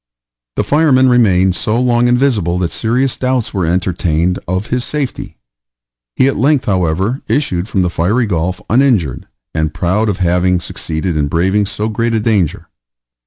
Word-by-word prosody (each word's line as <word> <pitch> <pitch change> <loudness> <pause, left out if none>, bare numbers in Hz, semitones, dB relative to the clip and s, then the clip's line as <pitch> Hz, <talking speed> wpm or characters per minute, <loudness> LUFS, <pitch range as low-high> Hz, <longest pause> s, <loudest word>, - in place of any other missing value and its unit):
The - - 0
fireman 140 -4 +3
remained 95 -7 +3
so 110 +5 -1
long 120 -1 +2
invisible 120 -9 +1
that 90 -2 -1
serious 125 +3 0
doubts 130 -2 -1
were 95 -5 -1
entertained 90 -1 0
of 95 +3 -2
his 125 -1 0
safety. 145 -2 -4 0.8
He 130 - +3
at 135 - 0
length, 145 0 +2
however, 95 - 0
issued 100 -9 -1
from 95 -4 +1
the 90 - 0
fiery 105 +10 +1
gulf 90 -2 -2
uninjured, 110 - +1 0.3
and 80 0 -2
proud 105 +5 0
of 100 - -1
having 90 0 +1
succeeded 80 0 -3
in 75 -1 0
braving 95 +7 +1
so 105 +1 -3
great 115 +1 -1
a - - +2
danger. 105 -7 0
100 Hz, 160 wpm, -15 LUFS, 90-125 Hz, 0.8 s, fireman